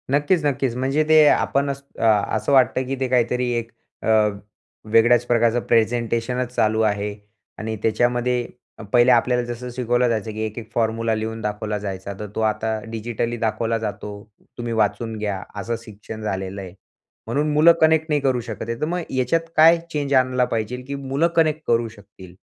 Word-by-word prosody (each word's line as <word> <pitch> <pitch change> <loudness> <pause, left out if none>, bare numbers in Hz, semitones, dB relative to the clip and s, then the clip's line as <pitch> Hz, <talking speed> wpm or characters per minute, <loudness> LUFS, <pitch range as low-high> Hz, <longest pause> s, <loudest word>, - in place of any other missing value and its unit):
नक्कीच, 150 +5 +2
नक्कीच, 135 -3 0
म्हणजे 135 +4 +1
ते 155 -1 +7
आपणच 140 -1 +1 0.2
अ, - - -2 0.3
असं 110 - -1
वाटतं 130 -1 +3
की 135 - -2
ते 130 - 0
काहीतरी 125 0 +1
एक 115 0 -5 0.3
अ, - - -3 0.8
वेगळ्याच 120 +1 +5
प्रकारचं 120 0 +2
प्रेझेंटेशनच 120 +2 0
चालू 110 0 +2
आहे 105 -1 0 0.4
आणि 110 0 -4
त्याच्यामध्ये 120 +2 +1 0.5
पहिले 120 +1 +6
आपल्याला 125 +1 +3
जसं 120 +1 -6
शिकवलं 120 0 +1
जायचं, 110 -1 -2
की 110 +1 -6
एक 110 +1 -7
एक 110 - -12
फॉर्म्युला 115 0 0
लिहून 110 +1 -4
दाखवला 105 0 -3
जायचा, 100 -1 -5
तर 105 - -5
तो - - -1
आता 110 0 0
डिजिटली 115 +1 -3
दाखवला 115 0 -1
जातो. 105 -1 -5 0.5
तुम्ही 120 -1 -3
वाचून 110 +1 0
घ्या, 100 -3 -3 0.2
असं 115 +4 -2
शिक्षण 110 0 -10
झालेलं 95 -1 -4
आहे. 90 -2 -9 0.5
म्हणून 150 +2 0
मुलं 155 +3 +7
कनेक्ट 160 0 +4
नाही 150 -1 +1
करू 130 -2 +1
शकत 110 0 -7
आहे, 115 0 -3
तर - - +2
मग 175 +3 -2
याच्यात 165 +6 0
काय 165 +2 +7
चेंज 145 -2 -2
आणला 130 -1 +3
पाहिजे 115 +1 -3
की 140 - -4
मुलं 140 +4 0
कनेक्ट 155 -2 +2
करू 115 0 +2
शकतील? 100 -4 -15
120 Hz, 170 wpm, -22 LUFS, 110-130 Hz, 0.8 s, ते